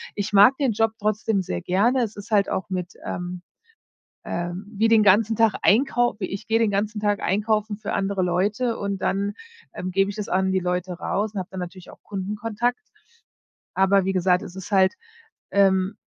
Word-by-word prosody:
Ich 205 0 -3
mag 205 +7 +7
den 265 -6 +1
Job 225 +1 +2
trotzdem 215 -1 0
sehr 90 - -4
gerne. 235 +8 +2
Es 215 -1 -4
ist 205 +3 -10
halt 200 -2 +3
auch 190 - -3
mit 180 -1 -4
ähm, 180 0 -5 0.8
ähm, 175 +3 -4
wie 220 +1 +1
den 225 -1 +6
ganzen 210 +3 +4
Tag 225 -1 +3
einkaufen. 240 0 +3
Ich 195 - -6
gehe 225 +1 +2
den 225 - +2
ganzen 210 +1 -1
Tag 205 -1 0
einkaufen 210 +1 0
für - - -5
andere 195 -1 -1
Leute. 205 +7 0
Und 200 -1 -3
dann, 200 +1 -1 0.4
ähm, 185 - -5
gebe 195 +2 +2
ich - - -10
das 210 - -4
an 190 +1 +1
die 190 - +2
Leute 180 0 -2
raus 205 +4 -2
und 195 - -3
habe 180 - -6
dann 190 - -6
natürlich 180 0 -9
auch - - -18
Kundenkontakt. 210 +5 -2 1.0
Aber, 190 0 +3
wie 195 - +1
gesagt, 180 0 +2
es 180 - -9
ist 190 +2 -8
halt 190 -1 +4 0.6
ähm, 195 0 +3
200 Hz, 190 wpm, -23 LUFS, 190-215 Hz, 1.0 s, mag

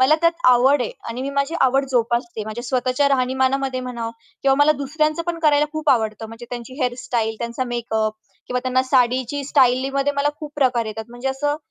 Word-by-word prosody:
मला 265 +4 +6
त्यात 335 0 +4 0.2
आवड 255 +3 +5
आहे - - -3 0.2
आणि 235 +2 -4
मी 275 - -3
माझी 280 +3 -1
आवड 270 +1 +3
जोपासते, 235 -2 0
माझ्या 220 +3 -6
स्वतःच्या 255 +2 +1
राहणीमानामध्ये 260 0 +1
म्हणा 240 -2 -4 0.3
किंवा 270 -1 +4
मला 290 +1 +6
दुसऱ्यांचं 305 +3 0
पण 340 -1 -2
करायला 295 -1 +4
खूप 310 -1 0
आवडतं 220 -2 0
म्हणजे 230 +1 -10
त्यांची 245 +1 -7
हेअरस्टाईल, 245 -3 -1
त्यांचा 235 +2 -3
मेकअप 225 -3 -2 0.3
किंवा 250 0 -1
त्यांना 255 0 +1
साडीची 255 +1 +1
स्टाईलीमध्ये 270 +1 +2
मला 280 +1 +2
खूप 300 -1 -7
प्रकार 250 -5 +2
येतात 220 +1 -5
म्हणजे 245 +3 -4
असं 290 +2 -1
255 Hz, 180 wpm, -21 LUFS, 240-280 Hz, 0.3 s, मला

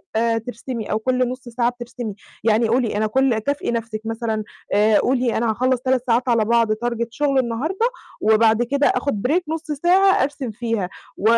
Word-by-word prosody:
آآ 230 0 +2
ترسمي، 230 0 -5
أو 215 - +1
كُلّ 255 +1 +1
نص 250 -1 -7
ساعة 240 0 +1
بترسمي. 240 -3 -7 0.3
يعني 225 +1 +3
قولي 230 -2 +1
أنا 215 0 +1
كل 255 -1 +2
كافئي 285 +1 -2
نفسِك 230 -2 -3
مثلًا، 225 -1 -2 0.3
آآ 210 +1 +4
قولي 250 -1 +1
أنا 230 0 +1
هاخلص 255 +2 0
3 260 -1 +1
ساعات 245 +2 +2
على 230 -2 +3
بعض 230 -1 +3
target 235 +1 -2
شغل 275 +2 +1
النهارده، 315 - 0 0.3
وبعد 220 +1 +4
كده 280 +4 +1
آخد 250 -3 0
break 345 +6 +2
نص 320 0 -4
ساعة 365 +5 +4
أرسم 275 -4 -3
فيها، 225 -4 -2 0.3
و - - -9
235 Hz, 180 wpm, -21 LUFS, 225-260 Hz, 0.3 s, آآ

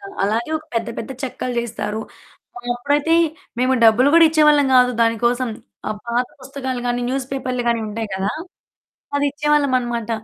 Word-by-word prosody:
అది 395 0 -11
అలాగే 225 +7 0
ఒక 310 - -9
పెద్ద, 230 0 -1
పెద్ద, 230 - -6
చెక్కలు 255 -1 -4
చేస్తారు. 220 -2 -3 0.6
ఆ! - - -5 0.2
అప్పుడైతే 290 +6 +1 0.4
మేము 255 +1 +2
డబ్బులు 225 +5 +6
గూడా 335 -1 +8
ఇచ్చేవాళ్ళం 300 -2 +4
గాదు, 250 0 +6
దాని 230 0 +2
కోసం. 245 +1 +1 0.4
ఆహ్, 215 -1 -4
పాత 240 +1 +1
పుస్తకాలు 260 -1 -5
గాని, 245 0 0
న్యూస్ 265 0 -2
పేపర్లు‌గాని 250 -3 -1
ఉండేయి 215 0 -5
కదా! 190 +2 -1 0.8
అది 285 - +1
ఇచ్చేవాళ్ళమనమాట. 255 -6 0
250 Hz, 150 wpm, -20 LUFS, 230-280 Hz, 0.8 s, గూడా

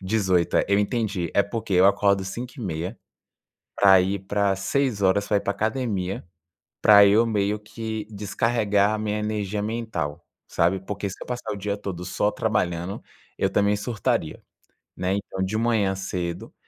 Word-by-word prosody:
18, 95 -3 +1
eh, - - +2
eu 100 0 +3
entendi. 105 -5 -1
É 100 - +5
porque 105 0 -5
eu 90 +1 +6
acordo 100 -1 +3
5 120 +6 -6
e - - -6
meia, 90 +1 -4 0.8
para 95 -1 +6
ir 95 +2 -1
para 100 +1 0
6 105 +3 -1
horas, 100 +1 +2
para 105 - +2
ir - - -1
para - - -1
a - - -7
academia, 110 -5 -2 0.6
para 100 -1 +8
eu 105 +3 +5
meio 105 -1 0
que 110 0 -6
descarregar 105 0 +1
a - - -2
minha 105 0 -2
energia 105 -1 -2
mental, 105 -9 -3 0.2
sabe, 90 +3 +1
porque 100 +1 -4
se 95 - -8
eu - - -8
passar 125 -1 -4
o - - -5
dia 100 +1 -2
todo 95 -4 -6
só 105 +3 0
trabalhando, 90 -4 -2 0.4
eu - - +1
também 105 0 +2
surtaria, 105 +1 -2 0.5
né, 95 +1 -1
então, 100 -1 -4
de 100 +3 -1
manhã 110 -4 +1
cedo 90 -2 -4
100 Hz, 175 wpm, -24 LUFS, 95-110 Hz, 0.8 s, para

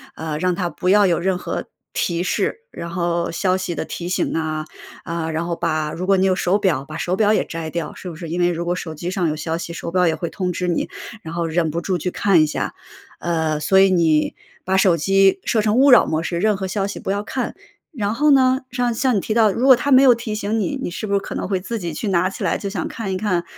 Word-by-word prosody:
呃， 160 -2 -4
让 180 +1 +1
它 175 -2 -1
不 180 +1 -2
要 205 +1 +6
有 175 -3 +2
任 185 +1 0
何 - - -4 0.3
提 170 0 -1
示， 450 - -1
然 170 - -7
后 170 0 -1
消 185 +2 +1
息 185 -2 -3
的 - - -3
提 175 0 -5
醒 185 - 0
呐， 155 -1 -2 0.4
啊， 170 -1 -3
然 160 +2 -2
后 170 0 -2
把 155 -1 -1
如 185 +2 -4
果 195 0 +4
你 190 - +3
有 190 -1 +3
手 185 +1 +1
表， 180 -10 +1
把 - - -7
手 180 - -1
表 210 +1 +3
也 - - +1
摘 165 -1 -5
掉， 165 -2 -4
是 185 - -8
不 165 - -8
是？ 165 +1 -7
因 175 +2 -1
为 175 - +4
如 170 0 -3
果 175 +1 0
手 160 -3 -6
机 175 +4 -4
上 180 -4 0
有 155 - -2
消 160 +2 -3
息， 170 0 -6
手 170 - -5
表 180 0 +3
也 160 - +1
会 170 - -4
通 185 -2 -2
知 180 +1 -3
你， 175 - -1 0.3
然 160 +1 -7
后 170 -1 -1
忍 165 0 0
不 165 - -2
住 185 -1 -1
去 180 - -2
看 195 -5 +3
一 155 - +3
下。 150 - -3 0.5
呃， 160 -3 -1
所 190 +6 +3
以 195 0 +5
你 160 -4 +2 0.3
把 190 +1 +1
手 190 -3 +4
机 195 - +3
设 220 - +2
成 210 +1 +1
勿 275 +2 +6
扰 245 - +8
模 160 +1 -1
式， 170 0 -2
任 210 +1 +2
何 190 - -3
消 195 +1 -1
息 200 - -6
不 195 - -3
要 200 - -1
看。 255 +4 -3 0.4
然 215 -8 -2
后 295 +6 +2
呢， 260 -1 +4
像 245 -1 0
像 255 +1 +1
你 - - +2
提 215 - -2
到， 220 -2 +4
如 235 +6 -1
果 265 -1 +9
它 285 +3 -2
没 260 0 +7
有 255 -2 +8
提 230 -2 -4
醒 215 +1 -1
你， 215 +7 -1
你 - - -3
是 215 +4 -5
不 200 - -5
是 200 - +3
可 - - -7
能 - - -3
会 190 -1 0
自 225 +5 -4
己 170 -3 -4
去 210 - -4
拿 185 -1 +2
起 - - -7
来 - - +1
想 195 -4 -3
看 200 -4 -5
一 185 - -1
看， 185 -4 0
185 Hz, 295 characters per minute, -21 LUFS, 170-205 Hz, 0.5 s, 果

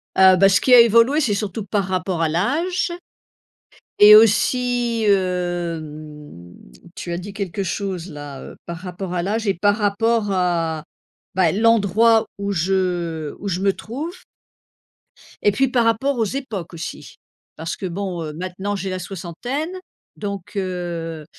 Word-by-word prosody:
Ah 190 0 +7
bah, 195 +2 +5
ce 195 - +3
qui 255 - +4
a 245 - +10
évolué, 235 +5 +5
c'est 235 -8 +1
surtout 205 0 -3
par 200 0 -1
rapport 185 -2 -2
à 160 - +2
l'âge. 315 - 0 1.1
Et 210 +1 +10
aussi, 235 +1 +3
hem, 160 - -3 0.4
tu 175 - -7
as 170 - -2
dit 195 +3 -8
quelque 200 -1 -4
chose 185 -1 -4
là, 145 -2 -8
heu, - - -10
par 170 0 -6
rapport 180 0 -6
à 175 - 0
l'âge 215 +2 -1
et 195 - +2
par 205 +4 +2
rapport 220 +1 +1
à, 170 -4 0 0.5
bah, 180 -3 +3
l'endroit 225 +1 +3
où 200 0 -2
je 175 -4 -1
où 200 - -4
je 185 0 -2
me 195 0 +2
trouve. 290 - -6 1.3
Et 205 - +5
puis, 270 +7 +2
par 240 -2 +2
rapport 250 +5 +1
aux 225 - +2
époques, 210 - -5
aussi. 160 -1 -8 0.4
Parce 165 +1 -4
que, 190 - -6
bon, 180 -1 -4
heu, 155 - -6
maintenant, 185 +4 -4
j'ai 195 -1 -4
la 185 0 -3
soixantaine, 195 - -5 0.5
donc, 200 -2 -6
heu, 175 -4 -4
195 Hz, 155 wpm, -21 LUFS, 175-220 Hz, 1.3 s, a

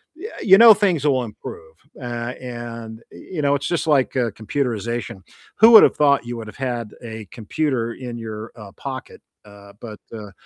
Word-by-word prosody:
yea 405 +7 -8
you 190 -1 +7
know 230 -1 +10
things 180 -8 0
will 130 -3 +2
improve. 80 -7 -10 0.3
Uh, 120 0 -4
and, 115 -2 -8
i - - -13
you 170 -5 -6
know, 140 0 +3
it's 140 +1 -3
just 175 -2 -1
like, 140 -3 +2
uh, 120 -4 0
computerization. 115 -2 -3 0.4
Who 225 +1 +8
would 220 - +10
have - - +4
thought 140 -4 +3
you 120 0 -5
would 110 -1 -8
have 105 - -11
had 120 -5 -4
a 110 -2 -8
computer 115 0 -2
in 120 -2 -7
your, 110 -1 -7
uh, 105 -3 -11
pocket? 130 -1 -8 0.2
Uh, 100 -1 -15
but, 110 -3 -9
uh, 105 -3 -8
120 Hz, 190 wpm, -21 LUFS, 110-140 Hz, 0.4 s, know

